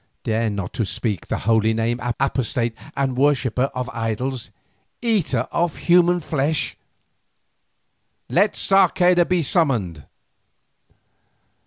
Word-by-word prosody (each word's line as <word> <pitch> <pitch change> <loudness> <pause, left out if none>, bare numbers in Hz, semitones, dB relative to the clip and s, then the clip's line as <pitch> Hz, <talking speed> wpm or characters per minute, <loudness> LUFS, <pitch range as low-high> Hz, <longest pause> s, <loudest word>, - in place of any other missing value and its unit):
"Dare 115 0 0
not 100 -3 -5
to 115 - -1
speak 105 -2 -3
that - - -3
holy 110 +1 +2
Name, 115 +2 -1 0.2
apostate 120 -3 0 0.2
and 135 -2 0
worshipper 135 -2 +1
of 125 -1 -3
idols, 115 +2 -3 0.5
eater 220 -8 0
of 170 -2 -1
human 175 0 +3
flesh. 150 -1 -1 1.5
Let 200 +4 +2
Sarceda 180 -2 +3
be 180 -2 +1
summoned." 115 - 0
130 Hz, 105 wpm, -21 LUFS, 115-170 Hz, 1.5 s, human